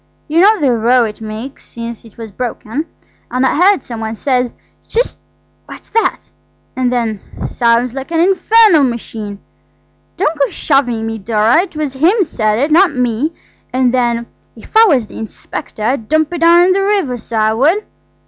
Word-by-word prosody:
You 320 +3 +2
know 425 +2 +5
the 280 -4 +2
row 240 +2 +3
it 215 0 -7
makes 220 +5 -7
since 235 -1 -8
it 225 -3 -17
was 225 -2 -8
broken, 250 +6 -4 0.4
and 255 +1 0
I - - +1
heard 370 -1 +3
some 235 -2 -7
one 220 0 -4
say, 250 0 0 0.4
'Shish! 485 +2 -1 0.5
what's - - -12
that?' 455 0 -1 0.4
and 255 -1 0
then, 225 -5 -1 0.2
'Sounds 235 +1 +1
like 270 +2 -6
an 330 -1 0
infernal 385 -1 +4
machine'–don't 235 - -6
go 275 - +2
shoving 245 -6 0
me, 225 0 -4
Dora, 220 +4 +2
it 370 -3 -8
was 300 -3 -3
him 350 - +3
said 215 -9 -1
it, 285 +6 0
not 345 -1 +4
me–and 250 0 -2
then, 235 -2 0 0.3
'If - - -16
I 445 +1 +8
was 275 - +2
the - - -11
inspector 220 -1 -7
I'd 230 -1 -1
dump 315 +1 +1
it 345 - -3
down 340 +1 +6
in 370 - +3
the 390 - +1
river, 390 -10 0
so 230 0 -8
I 215 0 +2
would. 315 - +2
255 Hz, 175 wpm, -15 LUFS, 230-330 Hz, 0.5 s, I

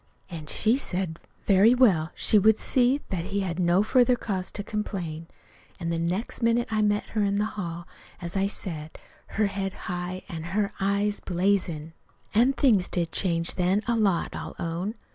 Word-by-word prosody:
An' 160 -3 -7
she 225 +9 +2
said, 180 -8 -2 0.3
very 205 +5 +5
well, 185 -11 +4
she 215 - +4
would 220 +2 +4
see 255 +3 +2
that 175 -3 -2
he 200 +1 -2
had 180 -2 -3
no 175 +2 +3
further 250 +2 +4
cause 190 -6 -3
to 205 - -4
complain. 180 -7 -4 0.5
An' 170 -2 -3
the 165 - -1
next 180 +10 -2
minute 230 +1 +2
I 215 -1 +1
met 205 0 0
her 215 - -1
in 200 0 +1
the 210 - +1
hall, 170 -3 -5 0.3
as 175 +1 -6
I 195 0 +2
just 200 - -1
said, 160 -4 -6 0.4
her 215 - +3
head 195 -1 -3
high 180 +1 -4
an' 165 -5 -6 0.2
her 205 -1 0
eyes 200 +1 0
blazin'. 175 -4 -1 0.4
"An' 240 +5 +4
things 225 -10 +3
did 170 -2 -1
change 170 -3 +2
then, 185 +3 +1
a 235 - +2
lot, 200 -6 +1
I'll - - -6
own. 175 +6 -3
195 Hz, 180 wpm, -26 LUFS, 175-215 Hz, 0.5 s, very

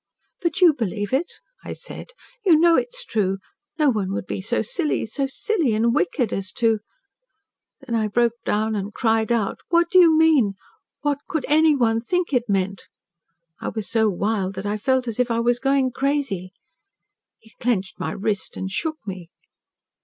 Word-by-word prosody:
"'But 340 +2 -1
you 345 -3 +7
believe 210 -4 -3
it,' 300 +7 0 0.3
I - - -6
said. - - -9 0.4
'You 350 -6 +6
know 340 0 +5
it 480 - +1
is - - -4
true. 195 -4 0 0.4
No 300 -4 +4
one 200 -5 -2
would 195 - -3
be - - -4
so 190 - 0
silly 365 -11 -1
so 270 +5 -2
silly 315 - 0
and 230 +2 +2
wicked 195 +6 0
as 195 -1 -3
to 225 -2 +2 0.6
' 320 0 -58
Then 265 -3 -6
I 220 -2 +1
broke 235 +2 +2
down 215 +1 0
and 205 +1 -4
cried 225 -1 +1
out. 225 -4 0
'What 340 0 +3
do 370 - +7
you 330 -3 +6
mean? 295 -11 +4 0.5
What 290 -1 0
could 315 -7 -2
anyone 285 -7 +3
think 355 +5 -1
it 245 -3 +1
meant?' 195 0 -1 0.7
I - - -3
was 220 -3 -5
so 220 -2 +3
wild 200 0 -1
that 190 +2 -5
I 205 +1 -1
felt 260 +4 0
as 230 0 -4
if 250 -1 +2
I 230 0 +1
was 240 +1 +2
going 270 -1 +2
crazy. 265 -9 -1 0.9
He 220 - -21
clenched 205 -6 -1
my - - -2
wrist 205 0 -3
and 190 0 -4
shook 315 - -2
me. 185 -4 -7
235 Hz, 185 wpm, -23 LUFS, 205-300 Hz, 0.9 s, you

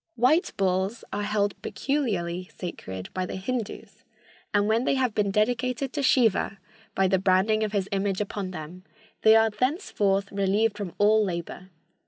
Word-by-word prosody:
"White 265 - +3
bulls 190 +3 0
are 205 - -1
held 205 -1 -1
peculiarly 190 -11 -2
sacred 95 - -7
by 185 -1 -2
the - - -5
Hindus, 220 +3 -5 0.5
and 205 0 +2
when 225 +2 +2
they 275 - +1
have 255 -4 +1
been 205 -1 +1
dedicated 245 +5 0
to 290 - -1
Siva 225 -7 +2 0.4
by 190 0 +3
the 190 0 +2
branding 195 +4 +2
of 215 - -1
his 200 -2 -1
image 195 -1 0
upon 205 -2 -3
them, 175 +1 -8 0.4
they 220 0 +7
are 225 0 +4
thenceforth 210 - 0
relieved 200 +2 +1
from 200 -4 -6
all 215 +1 +4
labor. 180 0 -5
205 Hz, 160 wpm, -26 LUFS, 190-225 Hz, 0.5 s, they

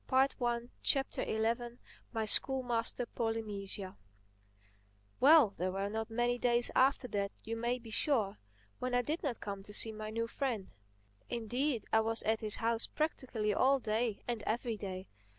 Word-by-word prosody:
THE - - -1
ELEVENTH 245 -3 +1
CHAPTER 235 -3 0 0.3
MY 225 -2 -1
SCHOOLMASTER, 245 0 +1
POLYNESIA 210 -5 -4 1.2
WELL, 290 -3 +7
there 185 -1 -2
were 195 +1 -2
not 220 +1 -3
many 240 +2 0
days 240 0 +4
after 265 -1 +3
that, 200 -1 -1
you 225 +1 -4
may 240 +2 -1
be 230 -2 -11
sure, 220 -5 +1 0.4
when 250 0 -1
I 245 - +3
did 310 +6 -2
not 270 -6 -2
come 200 -1 -5
to 205 +1 -11
see 225 - +4
my 215 0 -6
new 230 +1 -1
friend. 230 -5 -3 0.6
Indeed 240 +2 -1
I 220 - +6
was 225 +1 +2
at 220 0 +1
his 215 -2 -1
house 230 0 +2
practically 250 -9 -1
all 270 +6 +4
day 225 -2 -1
and 235 -3 -2
every 235 0 -1
day. 190 -2 -6
230 Hz, 155 wpm, -34 LUFS, 215-245 Hz, 1.2 s, WELL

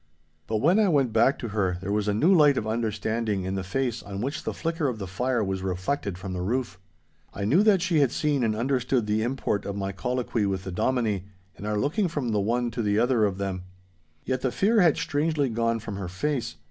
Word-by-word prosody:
But 110 - 0
when 170 - +3
I 210 -3 +4
went 135 -8 +2
back 115 +5 +4
to 120 - -5
her, 95 -4 0
there 95 +2 -4
was 105 0 0
a 105 - +2
new 165 - +4
light 150 -6 +5
of - - -1
understanding 110 -2 -1
in 95 +1 -3
the 95 -1 -2
face 120 +5 -2
on 100 -1 -7
which 135 +7 -3
the - - -2
flicker 165 -2 -1
of 125 -4 -2
the 100 - -5
fire 120 +6 -1
was 95 -1 -2
reflected 95 +2 -2
from 95 +1 -6
the 90 - -3
roof. 115 -1 -2 0.6
I 100 - -2
knew 145 - +4
that 205 -4 +4
she 175 -5 +2
had 140 -4 +3
seen 145 -3 0
and 110 -2 +1
understood 125 0 0
the 105 +1 0
import 120 -4 -1
of 100 - -4
my 100 -1 -2
colloquy 115 +2 -1
with 95 -1 -2
the 95 - -5
Dominie, 105 -1 0 0.3
and 105 - -7
our 105 0 0
looking 170 - +1
from 145 -7 -3
the 105 -2 +1
one 120 +3 0
to 115 - -3
the 105 -1 +1
other 120 -1 +3
of 100 -2 -1
them. 95 -2 -3 0.6
Yet 130 -1 -1
the 130 - 0
fear 215 - +3
had 165 -5 +4
strangely 145 -1 0
gone 115 0 0
from 105 -2 -6
her 95 -2 -4
face. 130 +8 -2
115 Hz, 235 wpm, -26 LUFS, 100-135 Hz, 0.6 s, light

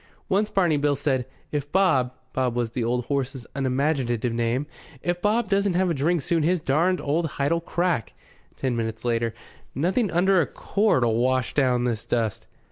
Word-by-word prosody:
Once 205 +3 +2
Barney 175 -6 +2
Bill 145 0 +2
said: 130 -3 -1 0.2
"If 145 -1 -3
Bob" 140 -10 +3 0.2
Bob 125 -2 0
was 120 -2 -1
the 120 0 -2
old 120 +1 0
horse's 135 -3 -2
unimaginative 130 -3 0
name 120 +4 0 0.4
"if 175 0 -1
Bob 215 +4 +2
doesn't 200 -2 +1
have 185 -1 +2
a - - +2
drink 160 +3 +1
soon 165 +2 +1
his 175 +4 +2
darned 165 +6 +1
old 160 +4 0
hide'll 145 +4 +1
crack." 170 - -1 0.4
Ten 130 -3 -1
minutes 110 0 -3
later: 115 -1 0 0.4
"Nothing 185 - +1
under 180 +2 +3
a - - -1
quart'll 130 - +1
wash 130 +1 +1
down 125 -4 +2
this 115 -4 -1
dust." 110 -4 -2
140 Hz, 170 wpm, -25 LUFS, 125-175 Hz, 0.4 s, Bob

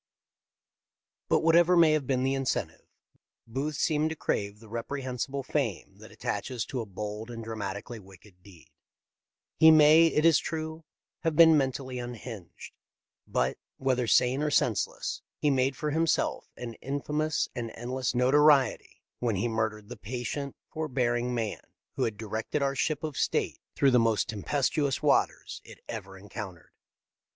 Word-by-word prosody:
But - - +3
whatever 170 +2 +5
may 165 -2 +6
have 150 -4 0
been 130 -2 +1
the 135 +1 +1
incentive. 135 -1 -2 0.6
Booth 135 +6 -3
seemed 155 +2 +1
to 160 - -4
crave 100 -7 -2
the 115 - -15
reprehensible 130 +3 -4
fame 130 - -3
that - - -13
attaches 125 -4 -3
to 130 - -4
a 110 - -7
bold 105 +3 -6
and 115 -1 -7
dramatically 110 +1 -5
wicked 95 -1 -17
deed. 90 -7 -17 0.9
He 160 - +9
may, 155 +1 +7
it 155 -1 +1
is 165 -2 +6
true, 160 0 -5 0.3
have 165 -2 -1
been 160 0 +8
mentally 130 -2 -1
unhinged, 120 -5 -8 0.5
but, 65 +1 0 0.2
whether 130 -2 0
sane 125 +4 +3
or 150 - +1
senseless, 145 - 0 0.2
he 150 - +2
made 130 0 +1
for 150 +3 -2
him 165 +2 +1
self - - 0
an 120 -2 -6
infamous 150 +3 -1
and 120 -2 -4
endless 125 +2 -3
notoriety 135 +1 +3 0.2
when 120 -4 0
he 95 +5 0
murdered 110 -2 -2
the - - -9
patient, 125 +5 -4
forbearing 125 -5 -1
man 110 -3 -3 0.3
who - - +1
had 110 -2 -3
directed 110 +6 -3
our 135 0 +1
ship 150 +2 -1
of 155 -3 -4
state - - 0 0.2
through 140 - +4
the 125 - +5
most 115 -2 +2
tem 105 -3 -5
pestuous 140 +1 0
waters - - +1
it - - -13
ever 95 0 -7
encountered. 95 -3 -9
130 Hz, 155 wpm, -28 LUFS, 110-150 Hz, 0.9 s, He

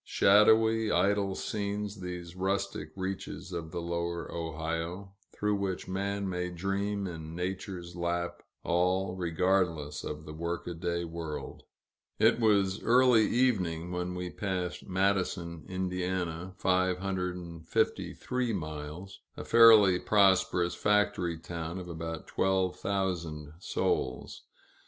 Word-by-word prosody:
Shadowy, 110 +2 +5
idle 100 -1 +2
scenes, 105 -1 -3
these 90 -1 -6
rustic 95 -4 -2
reaches 95 0 -5
of 80 -2 -4
the 85 +2 -4
lower 85 0 -3
Ohio, 80 +4 -4 0.2
through 105 0 0
which 95 -2 -3
man 100 +1 -2
may 90 -1 -2
dream 100 +3 -2
in 80 -3 -6
Nature's 90 -1 -4
lap, 85 0 -2 0.2
all 90 +2 +1
regardless 85 -4 0
of 75 +1 -6
the 75 - -8
workaday 85 +1 -3
world. 80 -2 -6 0.6
It - - +4
was 100 -3 +3
early 120 -1 +5
evening 90 -10 +1
when 90 0 -3
we 90 0 -4
passed 90 -3 -3
Madison, 90 -3 0
Ind. 90 -1 -2
(553 90 +5 -1
miles), 80 +2 -6 0.2
a - - -6
fairly 110 -5 +7
prosperous 95 -4 +3
factory 105 -5 +1
town 85 +1 -5
of 90 -1 -6
about 80 -1 -5
twelve 95 -1 +1
thousand 85 -6 -2
souls. 65 -7 -2
90 Hz, 110 wpm, -30 LUFS, 85-100 Hz, 0.6 s, fairly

